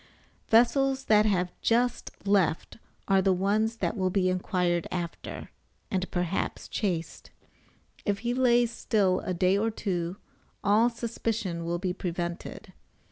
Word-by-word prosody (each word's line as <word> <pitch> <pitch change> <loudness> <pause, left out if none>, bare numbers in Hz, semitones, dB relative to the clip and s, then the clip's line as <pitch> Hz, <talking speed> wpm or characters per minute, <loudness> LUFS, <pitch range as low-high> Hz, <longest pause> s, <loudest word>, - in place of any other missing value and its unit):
Vessels 265 +4 +3
that 215 0 +5
have 180 -3 0
just 240 +1 +1 0.2
left 195 -5 +1 0.3
are 195 -1 +4
the 190 0 +3
ones 205 +5 +1
that 225 - -2
will 185 -3 0
be 185 0 +1
inquired 180 -2 0
after, 175 -2 -5 0.4
and 185 -1 -1
perhaps 175 +1 -2
chased. 175 -6 -3 0.7
If 200 -1 0
he 240 - +1
lays 245 -2 +3
still 195 -6 +1
a 185 - -3
day 185 +3 +3
or 225 +2 +1
two 180 -4 -3 0.5
all 215 +4 +4
suspicion 225 -7 -3
will 170 +1 -1
be 180 0 -2
prevented. 175 -2 -5
195 Hz, 135 wpm, -28 LUFS, 180-225 Hz, 0.7 s, that